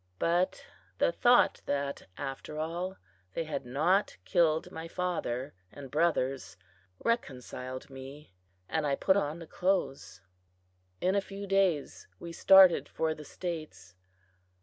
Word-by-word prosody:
But 175 - +1 0.3
the - - +3
thought 245 - +4
that, 140 0 -2
after 140 +2 -6
all, 170 +4 -3 0.4
they - - 0
had 145 -5 -5
not 165 +11 +1
killed 160 - +2
my 160 +1 -6
father 165 -8 -2 0.2
and 135 -3 -10
brothers, 135 - 0 0.5
reconciled 130 - -3
me, 135 -2 -10 0.3
and 160 -2 0
I 140 - +2
put 190 - +3
on 160 -5 0
the 170 - -9
clothes. 180 - -1 0.8
In 185 - +2
a 200 - +2
few 200 0 -7
days 195 -7 +1
we 170 - -7
started 190 0 +7
for 160 -1 -1
the 155 - -10
States. 155 - -6
160 Hz, 125 wpm, -30 LUFS, 135-180 Hz, 0.8 s, started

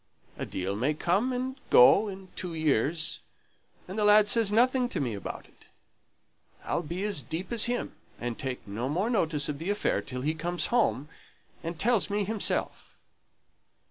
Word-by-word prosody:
a - - -5
deal 95 +2 -3
may 130 +8 0
come 195 +11 +1
and 255 +1 -3
go 195 - +7
in 190 -1 -8
two 175 -3 -5
years! 155 +1 0 0.7
and 190 +4 -5
the - - +2
lad 210 0 +6
says 220 -1 +4
nothing 250 +3 +3
to 185 - -3
me 125 -5 -1
about 100 - -6
it. - - -22 1.0
I'll - - -1
be 170 +4 -5
as 205 -8 0
deep 160 - -6
as 235 -2 +3
him, 245 0 -2 0.3
and 120 -1 -3
take 130 -4 -5
no 115 +6 -3
more 190 +10 0
notice 160 - +1
of 145 -1 -4
the 165 +4 -4
affair 205 - 0
till 125 -1 -6
he 150 +4 0
comes 175 +2 -2
home 185 - +2 0.5
and 165 0 -5
tells 230 -1 +2
me 205 0 0
himself." 210 +1 -2
175 Hz, 175 wpm, -28 LUFS, 145-215 Hz, 1.0 s, go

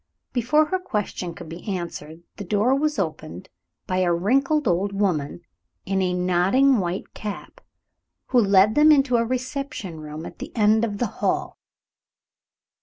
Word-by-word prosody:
Before 260 +6 +3
her 375 +5 -1
question 210 - -4
could - - -10
be 165 +2 -9
answered, 170 -4 -5
the - - -5
door 210 +6 +1
was 300 +2 0
opened 155 - -4 0.4
by 185 - -2
a 180 -2 +2
wrinkled 270 - +1
old 190 +3 +1
woman, 175 -6 -1 0.4
in 195 0 0
a 180 -1 0
nodding 185 +9 +3
white 180 +1 -4
cap, 210 -2 -7 0.7
who 250 - +4
led 200 0 +4
them 300 +3 +6
into 270 -4 +4
a 230 - +2
reception 255 - -4
room 155 +1 -8
at - - -10
the - - -7
end 220 0 +3
of 210 -3 -2
the 245 - 0 0.2
hall. - - -1
205 Hz, 155 wpm, -23 LUFS, 175-255 Hz, 0.7 s, them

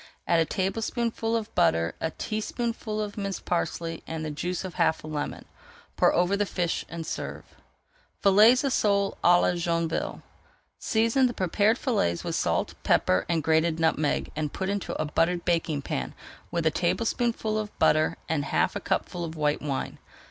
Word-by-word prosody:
Add 170 - +4
a 165 - +3
tablespoonful 225 +4 -1
of 225 -1 -3
butter, 85 +1 +2
a 160 - 0
teaspoonful 215 +3 -3
of 210 0 -4
minced 195 -2 -4
parsley, 165 -1 -2
and 160 -1 -4
the 155 - -3
juice 175 +5 -3
of 185 - -6
half 165 -2 +1
a - - -8
lemon. 150 -1 -4 0.5
Pour - - +4
over 180 +3 +2
the 205 0 0
fish 175 -3 -1
and 165 -1 -6
serve. - - -5 0.8
FILLETS 215 +7 +6
OF 275 -2 +1
SOLE 200 -1 +2
À 175 0 +6
LA - - +2
JOINVILLE 170 -1 -1 0.6
Season 230 +4 +2
the 240 - -5
prepared 205 +5 +2
fillets 210 - 0
with - - -3
salt, - - 0
pepper, 90 - +2
and 165 -3 +1
grated 160 +1 +2
nutmeg, 155 -2 +1
and 150 -1 -2
put 190 0 -2
into 200 -1 -3
a 155 - 0
buttered 170 +3 0
baking 165 -4 0
pan 65 - -3 0.3
with 170 -1 -2
a 160 - +4
tablespoonful 225 +4 0
of 210 -1 -3
butter 155 0 +3
[Page - - -33
387] - - -1
and 145 -2 -1
half - - +1
a - - -1
cupful 175 - -2
of 165 -1 -5
white 150 -1 0
wine. 140 -3 -3
175 Hz, 175 wpm, -27 LUFS, 160-215 Hz, 0.8 s, FILLETS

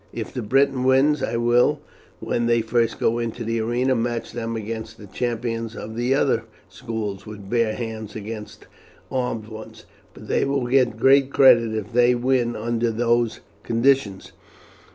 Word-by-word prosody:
If 115 -2 -6
the 125 - -3
Briton 130 +3 +2
wins, 135 +3 +3
I 115 - -1
will, 120 +1 +3 0.4
when 120 0 -1
they 120 -1 +3
first 115 0 0
go 115 +1 +1
into 115 0 -4
the 115 0 -1
arena, 120 +4 +1
match 120 -1 -2
them 115 -1 -4
against 110 +1 -6
the 105 - -11
champions 115 +1 -3
of 110 +1 -7
the 120 +3 +1
other 125 -5 +1 0.2
schools 105 -1 -5
with 105 -2 -10
bare 115 -2 +1
hands 110 -3 -6
against 110 0 -8 0.5
armed 125 -4 -2
ones, 110 0 -11 0.3
and - - -12
they - - +1
will 140 -2 0
get 125 -3 +2
great 135 +3 +4
credit 115 -5 +5
if 110 +1 -5
they 120 +1 +4
win 120 -1 +1
under 115 +1 -1
those 120 0 0 0.2
conditions. 115 -4 +1
115 Hz, 160 wpm, -23 LUFS, 110-125 Hz, 0.5 s, credit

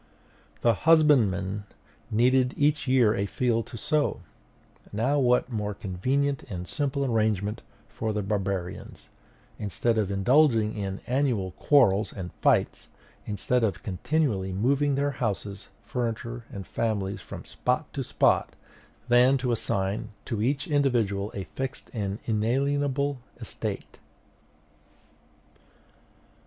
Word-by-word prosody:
The 115 - +4 0.2
husbandman 105 - +4 0.4
needed 125 +3 +3
each 145 0 +2
year 125 -5 +4
a 100 -1 -1
field 115 +1 0
to - - -8
sow; 150 +6 0 0.7
what 125 +3 +2
more 105 -2 -2
convenient 130 +10 -1
and 90 -2 -5
simple 140 -1 -1
arrangement 110 -3 0 0.3
for 110 -1 -3
the 105 -1 -2
barbarians, 95 -3 -4 0.5
instead 110 +3 0
of 105 -3 0
indulging 110 +2 +3
in 100 -2 -4
annual 125 -8 0
quarrels 110 -3 +3
and 90 -3 -7
fights, - - +2 0.4
instead 115 +4 0
of 100 -6 -1
continually 100 - 0
moving 135 +8 +1
their 140 +1 +1
houses, 105 -5 -4 0.2
furniture, 120 -1 -3
and 100 -2 -7
families 105 -3 -2
from - - -9
spot - - -2
to - - -2
spot, - - +2 0.5
than 125 +2 +5
to 125 -1 -1
assign 100 -2 -1 0.2
to 115 -5 -2
each 135 +5 0
individual 120 -9 +1
a 100 - -3
fixed 135 +5 -6
and 100 -3 -2
inalienable 140 +5 0 0.2
estate? - - -5
115 Hz, 115 wpm, -27 LUFS, 100-135 Hz, 0.7 s, than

